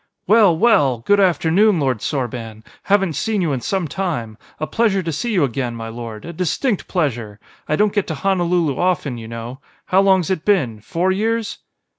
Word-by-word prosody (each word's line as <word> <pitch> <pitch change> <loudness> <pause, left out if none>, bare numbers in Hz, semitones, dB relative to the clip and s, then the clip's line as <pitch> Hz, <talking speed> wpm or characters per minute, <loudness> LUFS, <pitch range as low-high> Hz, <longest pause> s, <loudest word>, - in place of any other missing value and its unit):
"Well, 205 -5 +5
well! 145 - +3
Good 205 0 +4
afternoon, 185 +1 +3
Lord 130 -5 0
Sorban! 120 -6 -4 0.2
Haven't 195 -4 +2
seen 215 - -1
you 165 -6 0
in 130 - -3
some 190 +4 -1
time. 150 - -3 0.2
A 155 - -1
pleasure 205 -1 +1
to 165 - -2
see 235 +11 -3
you 185 -7 +2
again, 125 -2 -2
my 115 -1 -6
lord, 115 -2 -8
a 170 - -7
distinct 185 - -1
pleasure! 120 - -2 0.3
I 155 - +2
don't 210 +3 +2
get 205 -2 0
to 160 - -3
Honolulu 175 -4 0
often, 165 -9 0
you 110 - -8
know. 115 +3 -7 0.3
How 190 +1 +3
long's 190 -3 +3
it 180 -5 -1
been? 135 - +1
Four 170 - -1
years?" 225 +3 -1
170 Hz, 185 wpm, -19 LUFS, 125-195 Hz, 0.3 s, Well